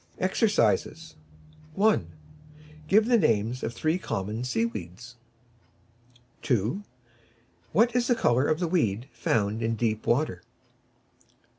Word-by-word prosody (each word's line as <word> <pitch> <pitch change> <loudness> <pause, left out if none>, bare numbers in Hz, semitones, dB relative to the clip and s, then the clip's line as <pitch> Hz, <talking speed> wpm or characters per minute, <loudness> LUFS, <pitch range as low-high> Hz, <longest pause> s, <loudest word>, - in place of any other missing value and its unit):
EXERCISES 185 -4 0 0.6
1. 205 - +2 0.8
Give 215 +5 +4
the 240 -1 +4
names 115 - +1
of 115 - -3
three 155 +8 -1
common 110 - -4
Sea 115 -3 0
weeds. 115 +2 -8 1.3
2. 120 - 0 0.9
What 230 +7 +3
is 245 -1 +2
the 245 - +3
colour 130 - +2
of 155 - +1
the 175 - 0
weed 120 - 0
found 110 -2 -1
in 115 0 0
deep 110 -1 -2
water? 120 - 0
120 Hz, 115 wpm, -27 LUFS, 110-185 Hz, 1.3 s, Give